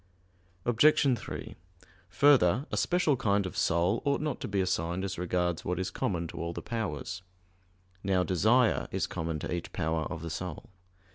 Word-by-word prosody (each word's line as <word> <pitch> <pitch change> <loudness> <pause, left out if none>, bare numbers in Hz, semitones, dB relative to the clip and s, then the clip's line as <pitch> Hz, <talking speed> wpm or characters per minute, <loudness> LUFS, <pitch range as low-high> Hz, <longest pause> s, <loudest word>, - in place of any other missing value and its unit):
Obj. 130 +2 +4
3: - - -7 0.5
Further, 125 - +4
a - - -1
special 175 -5 +2
kind 100 -5 +1
of 95 - -6
soul 85 +6 +1
ought 140 0 +1
not 150 -2 -2
to - - -3
be 100 -1 -1
assigned 90 -1 -1
as 95 -3 -4
regards 90 -1 -1
what 90 0 -2
is 95 +1 -2
common 85 -3 -2
to - - -6
all 85 0 -3
the - - -6
powers. 95 -6 -4 0.8
Now 95 -2 +2
desire 110 +7 +3
is - - -1
common 80 -1 -3
to - - -3
each 85 - -4
power 80 0 -1
of 80 -2 -6
the 85 - -4
soul. 90 +1 -6
95 Hz, 170 wpm, -30 LUFS, 85-115 Hz, 0.8 s, Obj